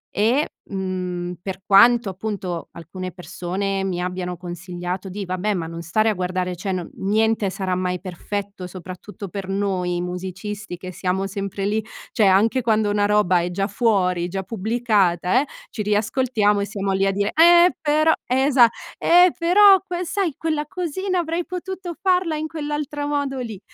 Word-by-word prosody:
e, 240 Hz, +9 st, +2 dB, 0.2 s
mhmm, 180 Hz, -2 st, -3 dB
per 190 Hz, 0 st, -6 dB
quanto, 230 Hz, +2 st, +6 dB
appunto, 190 Hz, -3 st, -4 dB
alcune 180 Hz, +2 st, -7 dB
persone 185 Hz, +3 st, -3 dB
mi 180 Hz, -2 st, -2 dB
abbiano 180 Hz, -1 st, -3 dB
consigliato 180 Hz, +1 st, -5 dB
di: 200 Hz, +1 st, -5 dB
"Vabbè, 185 Hz, +3 st, -1 dB
ma 165 Hz, -2 st, -3 dB
non 165 Hz, 0 st, -7 dB
stare 215 Hz, +7 st, +1 dB
a -, -, +2 dB
guardare, 180 Hz, -1 st, -2 dB
cioè 190 Hz, +3 st, -4 dB
no 180 Hz, -2 st, -3 dB
niente 215 Hz, +1 st, +1 dB
sarà 190 Hz, -1 st, -3 dB
mai 180 Hz, -1 st, -1 dB
perfetto". 195 Hz, +1 st, -5 dB
Soprattutto 185 Hz, +3 st, -9 dB
per 190 Hz, +1 st, -6 dB
noi 185 Hz, -3 st, -1 dB
musicisti, 185 Hz, +2 st, -5 dB
che 185 Hz, 0 st, -8 dB
siamo 185 Hz, +2 st, -1 dB
sempre 195 Hz, 0 st, -4 dB
lì, 215 Hz, +1 st, 0 dB, 0.3 s
cioè 210 Hz, -4 st, +3 dB
anche 215 Hz, +7 st, +4 dB
quando 215 Hz, -2 st, +2 dB
una 205 Hz, 0 st, +2 dB
roba 205 Hz, -4 st, +3 dB
è 175 Hz, -, -2 dB
già 195 Hz, +2 st, -1 dB
fuori, 190 Hz, -6 st, +1 dB
già 190 Hz, +2 st, -4 dB
pubblicata, 215 Hz, -1 st, +1 dB
eh, -, -, -3 dB, 0.3 s
ci 215 Hz, -, -4 dB
riascoltiamo 210 Hz, 0 st, +1 dB
e 200 Hz, -, 0 dB
siamo 200 Hz, -2 st, -2 dB
lì 195 Hz, +1 st, +2 dB
a -, -, +2 dB
dire: 200 Hz, +1 st, 0 dB
"Eh, 345 Hz, +3 st, +7 dB
però". 310 Hz, +1 st, +3 dB
Eh, 255 Hz, -, 0 dB
esa 255 Hz, -5 st, +6 dB, 0.3 s
"Eh 355 Hz, +1 st, +6 dB
però 385 Hz, +3 st, +6 dB
que 360 Hz, -1 st, -4 dB
sai, 365 Hz, -6 st, -1 dB
quella 310 Hz, -2 st, -2 dB
cosina 365 Hz, +2 st, -2 dB
avrei 335 Hz, +1 st, -1 dB
potuto 365 Hz, -1 st, -6 dB
farla 360 Hz, -4 st, +2 dB
in 310 Hz, +1 st, -3 dB
quell'altro 295 Hz, -2 st, -4 dB
modo 285 Hz, -2 st, -1 dB
lì". 220 Hz, -6 st, -5 dB
200 Hz, 165 wpm, -22 LUFS, 185-255 Hz, 0.3 s, Eh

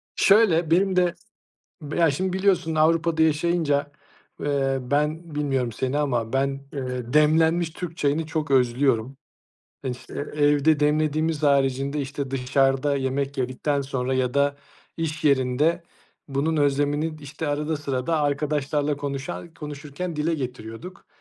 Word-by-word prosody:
Şöyle, 180 Hz, -6 st, +4 dB
benim 190 Hz, +2 st, +3 dB
de, 180 Hz, -1 st, +3 dB, 0.7 s
b 150 Hz, 0 st, -5 dB
ya, 165 Hz, -3 st, +4 dB
şimdi 185 Hz, +6 st, -2 dB
biliyorsun 190 Hz, -4 st, +1 dB
Avrupa'da 160 Hz, +1 st, +2 dB
yaşayınca, 155 Hz, -2 st, +1 dB, 0.5 s
eee, 135 Hz, -2 st, 0 dB
ben 150 Hz, +4 st, -1 dB
bilmiyorum 135 Hz, -5 st, 0 dB
seni 130 Hz, +5 st, -2 dB
ama 125 Hz, -5 st, -1 dB
ben, 135 Hz, +1 st, +2 dB, 0.3 s
eee, 125 Hz, -3 st, -4 dB
demlenmiş 160 Hz, +2 st, +4 dB
Türk 165 Hz, 0 st, -7 dB
çayını 150 Hz, +2 st, 0 dB
çok 155 Hz, -2 st, -3 dB
özlüyorum. 130 Hz, 0 st, +2 dB, 0.7 s
İşte, 125 Hz, -1 st, -6 dB, 0.2 s
evde 145 Hz, 0 st, +3 dB
demlediğimiz 155 Hz, +1 st, +1 dB
haricinde, 140 Hz, 0 st, +2 dB
işte, 140 Hz, 0 st, -4 dB
dışarıda 135 Hz, +2 st, +1 dB
yemek 135 Hz, +1 st, -2 dB
yedikten 130 Hz, +3 st, -1 dB
sonra 130 Hz, -1 st, -2 dB
ya 125 Hz, -1 st, 0 dB
da 140 Hz, 0 st, +2 dB, 0.4 s
iş 160 Hz, -2 st, -3 dB
yerinde 140 Hz, +5 st, +2 dB, 0.5 s
bunun 145 Hz, +4 st, 0 dB
özlemini, 145 Hz, +2 st, +1 dB
işte, 145 Hz, +2 st, -5 dB
arada 150 Hz, +2 st, -1 dB
sırada 145 Hz, +2 st, -1 dB
arkadaşlarla 145 Hz, 0 st, 0 dB
konuşa-konuşurken 150 Hz, +3 st, -6 dB
dile 160 Hz, +2 st, 0 dB
getiriyorduk. 125 Hz, +5 st, -7 dB
145 Hz, 120 wpm, -24 LUFS, 135-160 Hz, 0.7 s, Şöyle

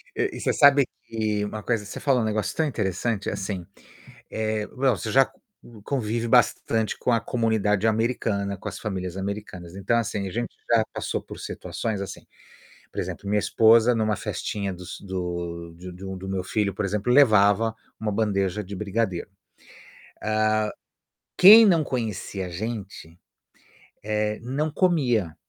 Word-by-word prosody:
E -, -, -1 dB
você -, -, 0 dB
sabe 140 Hz, -1 st, +6 dB, 0.2 s
que 105 Hz, -2 st, -1 dB
uma 105 Hz, 0 st, -6 dB
coisa 110 Hz, -3 st, -1 dB
você 100 Hz, -, -7 dB
falou 135 Hz, -4 st, +2 dB
um -, -, 0 dB
negócio 110 Hz, -1 st, -1 dB
tão 160 Hz, -, +1 dB
interessante, 105 Hz, -, -1 dB
assim, 95 Hz, -2 st, -4 dB, 0.7 s
eh, 110 Hz, -1 st, -2 dB
bom, 130 Hz, -4 st, +1 dB
você 110 Hz, -, -4 dB
já 135 Hz, +1 st, +6 dB
c -, -, -22 dB, 0.5 s
convive 115 Hz, -3 st, -1 dB
bastante 115 Hz, -2 st, +2 dB
com -, -, 0 dB
a 115 Hz, -, +4 dB
comunidade 110 Hz, -3 st, +1 dB
americana, 110 Hz, -3 st, 0 dB
com -, -, -6 dB
as -, -, -7 dB
famílias 95 Hz, -4 st, -4 dB
americanas. 95 Hz, -3 st, -6 dB
Então 100 Hz, +4 st, +1 dB
assim, 105 Hz, -4 st, -1 dB
a -, -, -7 dB
gente 120 Hz, +5 st, -2 dB, 0.2 s
já 115 Hz, -2 st, +5 dB
passou -, -, -3 dB
por -, -, -10 dB
situações 110 Hz, -4 st, -4 dB
assim, 100 Hz, -, -7 dB, 0.7 s
por -, -, -5 dB
exemplo, 100 Hz, -, -6 dB
minha 105 Hz, 0 st, +3 dB
esposa 115 Hz, +3 st, +5 dB
numa 110 Hz, -1 st, +1 dB
festinha 100 Hz, -1 st, -3 dB
dos 90 Hz, -1 st, -8 dB
do 85 Hz, -3 st, -5 dB
de 90 Hz, +1 st, -9 dB
de 95 Hz, +2 st, -10 dB
um 95 Hz, 0 st, -5 dB
do 95 Hz, +1 st, -7 dB
meu 95 Hz, -1 st, -2 dB
filho, 100 Hz, +1 st, -1 dB
por 100 Hz, -, -2 dB
exemplo, 105 Hz, +4 st, -1 dB
levava 110 Hz, -4 st, +5 dB, 0.2 s
uma 110 Hz, -1 st, -2 dB
bandeja 100 Hz, -1 st, 0 dB
de 100 Hz, +2 st, -7 dB
brigadeiro. 100 Hz, -2 st, -2 dB
Hã, 95 Hz, -, -40 dB, 2.0 s
quem 215 Hz, +4 st, +10 dB
não 170 Hz, -5 st, +4 dB
conhecia 110 Hz, -6 st, -3 dB
a -, -, -6 dB
gente 105 Hz, +2 st, -4 dB, 1.1 s
eh, 105 Hz, 0 st, -1 dB
não 140 Hz, +6 st, -2 dB
comia. 125 Hz, -, +1 dB
105 Hz, 160 wpm, -25 LUFS, 95-115 Hz, 2.0 s, quem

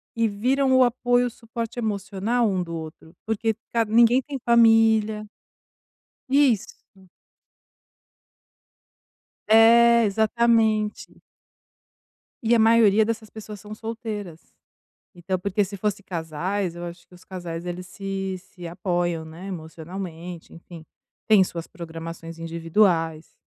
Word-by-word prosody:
e 230 Hz, 0 st, +2 dB
viram 260 Hz, +6 st, +1 dB
o 260 Hz, -, +6 dB
apoio, 245 Hz, 0 st, +2 dB
o -, -, -3 dB
suporte 230 Hz, +1 st, -6 dB
emocional 215 Hz, +2 st, -1 dB
um 190 Hz, -2 st, -1 dB
do 170 Hz, -1 st, -5 dB
outro, 160 Hz, 0 st, -9 dB
porque 220 Hz, +1 st, -1 dB, 0.2 s
ca 230 Hz, -1 st, +1 dB
ninguém 235 Hz, +3 st, +4 dB
tem 280 Hz, 0 st, -6 dB
família. 225 Hz, -2 st, +4 dB, 1.0 s
Isso. 265 Hz, -6 st, +2 dB, 2.7 s
É, 235 Hz, +1 st, +6 dB
exatamente. 220 Hz, 0 st, +1 dB, 1.2 s
E 230 Hz, +1 st, +3 dB
a -, -, +4 dB
maioria 220 Hz, -1 st, +5 dB
dessas 220 Hz, -1 st, -4 dB
pessoas 215 Hz, -2 st, -9 dB
são 210 Hz, +1 st, -9 dB
solteiras. 215 Hz, -6 st, -6 dB, 0.8 s
Então 185 Hz, +1 st, -3 dB
porque 200 Hz, +2 st, 0 dB
se 200 Hz, -, -8 dB
fossem 205 Hz, 0 st, -2 dB
casais, 175 Hz, +2 st, -3 dB
eu 175 Hz, -, -7 dB
acho 170 Hz, 0 st, -10 dB
que -, -, -22 dB
os 180 Hz, -, -18 dB
casais 175 Hz, -3 st, -7 dB, 0.2 s
se 195 Hz, 0 st, -5 dB
se 180 Hz, -1 st, -11 dB
apoiam 175 Hz, -2 st, -2 dB
emocionalmente, 175 Hz, -1 st, -8 dB
né? -, -, -11 dB
Enfim, 170 Hz, -1 st, -13 dB, 0.4 s
têm 210 Hz, -3 st, +6 dB
suas 170 Hz, -2 st, -6 dB
programações 165 Hz, -2 st, -8 dB
individuais. 165 Hz, -1 st, 0 dB
205 Hz, 115 wpm, -24 LUFS, 175-225 Hz, 2.7 s, o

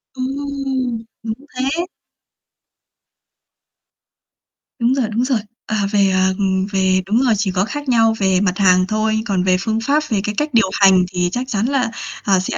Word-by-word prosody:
Ừm, 265 Hz, -3 st, -3 dB, 0.2 s
đúng 220 Hz, -1 st, -2 dB, 0.2 s
thế! 275 Hz, +7 st, -1 dB, 2.9 s
Đúng 240 Hz, +2 st, +2 dB
rồi, 265 Hz, -4 st, 0 dB
đúng 225 Hz, +3 st, 0 dB
rồi. 255 Hz, -3 st, +1 dB, 0.3 s
À, 215 Hz, -2 st, 0 dB
về, 200 Hz, -2 st, +3 dB
à, 190 Hz, 0 st, +2 dB
ừm, 190 Hz, -2 st, 0 dB
về 190 Hz, -1 st, +2 dB
đúng 220 Hz, +6 st, +1 dB
rồi, 245 Hz, -4 st, +3 dB
chỉ 200 Hz, -1 st, 0 dB
có 185 Hz, +1 st, 0 dB
khác 290 Hz, +4 st, -5 dB
nhau 225 Hz, -2 st, +4 dB
về 190 Hz, -2 st, +2 dB
mặt 190 Hz, -2 st, 0 dB
hàng 185 Hz, -2 st, +4 dB
thôi, 220 Hz, +1 st, 0 dB
còn 195 Hz, -5 st, 0 dB
về 185 Hz, 0 st, +3 dB
phương 220 Hz, +3 st, -1 dB
pháp, 290 Hz, +5 st, +1 dB
về 210 Hz, -5 st, 0 dB
cái 210 Hz, 0 st, -3 dB
cách 300 Hz, +1 st, 0 dB
điều 225 Hz, -4 st, +3 dB
hành 190 Hz, -2 st, +5 dB
thì 180 Hz, -1 st, 0 dB
chắc 250 Hz, +4 st, -3 dB
chắn 210 Hz, -3 st, -1 dB
là, 255 Hz, -3 st, 0 dB, 0.3 s
à, 195 Hz, -2 st, +3 dB
sẽ, 185 Hz, -, -3 dB
220 Hz, 175 wpm, -18 LUFS, 190-255 Hz, 2.9 s, hành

